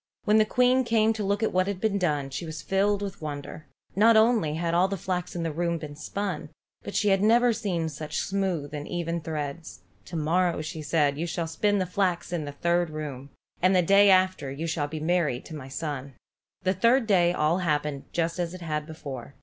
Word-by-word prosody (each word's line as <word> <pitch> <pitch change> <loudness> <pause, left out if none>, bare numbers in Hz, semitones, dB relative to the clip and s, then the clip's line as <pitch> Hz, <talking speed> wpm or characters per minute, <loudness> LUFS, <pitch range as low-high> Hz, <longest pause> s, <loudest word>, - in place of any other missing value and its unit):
When 215 +1 +4
the 215 - +5
Queen 250 +3 +3
came 225 -2 +3
to 215 -1 -4
look 200 +2 0
at - - 0
what 185 +1 +2
had 200 -2 -3
been 205 -1 0
done, 145 -6 0
she 135 - -4
was 160 -1 -6
filled 200 +1 +1
with 195 -4 -6
wonder. 150 0 -6 0.3
Not 220 +3 +6
only 220 -9 +3
had 165 +1 -1
all 180 +2 +4
the 195 0 -3
flax 180 0 -3
in 170 - -2
the 165 - -1
room 170 +1 0
been 150 -2 -8
spun, 170 -1 -4 0.3
but - - -7
she 210 - +2
had 195 -1 +3
never 235 +3 +4
seen 190 -7 -2
such 155 0 -5
smooth 185 -7 -1
and 150 0 -5
even 170 -1 -2
threads. 155 0 -5 0.2
"To 175 - -8
morrow," 170 +3 +1
said 155 -1 0
she, 145 - -9
"you 170 - -1
shall 170 0 -2
spin 205 +6 +1
the 185 - 0
flax 180 -1 -1
that 175 - 0
is - - -3
in 155 - -5
the 145 - -5
third 170 +3 0
room, 145 -3 -6 0.3
and 185 +2 +4
the 180 - +4
day 200 +3 +6
after 185 -7 +3
you 145 +5 -4
shall 160 -3 -1
be 155 +1 -5
married 155 -5 0
to 160 - -8
my 140 -3 -8
son." 140 -2 -5 0.5
The 185 0 +2
third 235 +6 +3
day 180 -5 +4
all 165 +1 +1
happened 150 -4 -1
just 165 +1 -1
as 175 0 -2
it 185 - -10
had 155 -2 -3
before. 140 -5 -8
170 Hz, 225 wpm, -27 LUFS, 155-195 Hz, 0.5 s, Not